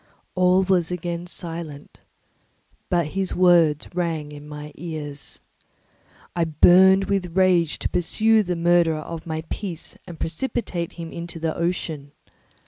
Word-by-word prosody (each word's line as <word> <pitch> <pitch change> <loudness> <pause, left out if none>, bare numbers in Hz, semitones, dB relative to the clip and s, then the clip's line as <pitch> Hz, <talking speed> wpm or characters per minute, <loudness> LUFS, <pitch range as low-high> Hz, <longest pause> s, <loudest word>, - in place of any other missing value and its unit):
All 185 +1 +4
was 180 -3 +2
again 175 0 -4
silent, 165 -4 -7 0.9
but 170 -3 +1
his 190 +3 -2
words 170 -5 +4
rang 165 -4 -2
in 145 0 -10
my 150 0 -8
ears. 150 -3 -6 0.9
I 170 - +2
burned 185 +5 +6
with 190 -3 -2
rage 180 -4 +3
to - - -2
pursue 220 +5 +2
the 180 -3 -2
murderer 170 -1 +3
of 165 +1 -7
my 160 0 -3
peace 180 -6 -5
and 170 -2 -9
precipitate 170 -1 -3
him 165 -1 -7
into 170 0 -7
the 160 -1 -1
ocean. 160 -4 -3
170 Hz, 135 wpm, -23 LUFS, 160-180 Hz, 0.9 s, burned